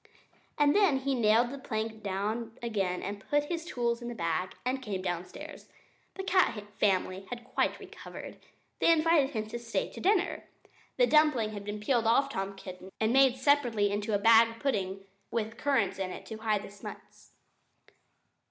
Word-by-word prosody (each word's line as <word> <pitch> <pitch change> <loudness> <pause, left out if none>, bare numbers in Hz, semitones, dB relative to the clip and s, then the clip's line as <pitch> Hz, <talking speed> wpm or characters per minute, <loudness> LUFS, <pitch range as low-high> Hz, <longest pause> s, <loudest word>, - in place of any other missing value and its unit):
Then 295 +1 +4
he 275 +1 0
nailed 235 0 +3
the 280 - -7
plank 220 -3 -4
down 215 +4 -3
again 195 -6 -1
and 200 +1 -4
put 290 0 +3
his 335 -1 -3
tools 235 -5 -1
in 240 - -5
his 240 - -7
bag, 170 +2 -1
and 260 +1 -1
came 195 -6 -4
downstairs. 175 -1 -6 0.5
The 385 - -5
cat 370 - +2 0.2
family 190 -1 +1
had 240 -1 -6
quite - - 0
recovered. - - -10 0.4
They - - +5
invited 320 -3 +4
him 220 -6 -3
to 235 - -5
stay 230 -1 -2
to - - -9
dinner. 395 -1 +1 0.5
The - - +6
dumpling 300 - +3
had 205 -1 -6
been 210 +1 -4
peeled 230 +1 +1
off 275 +5 +4
Tom 195 -5 -4
Kitten 185 0 -10
and 220 +2 +2
made 265 -1 +5
separately 250 -7 +2
into 205 +1 -1
a - - +4
bag 230 +2 +5
pudding, 195 -8 -1 0.3
with 225 -1 -2
currants 235 -10 +1
in 190 -1 -2
it - - -8
to 220 - -7
hide 215 -2 0
the - - -9
smuts. 205 - -12
225 Hz, 170 wpm, -30 LUFS, 205-270 Hz, 0.5 s, The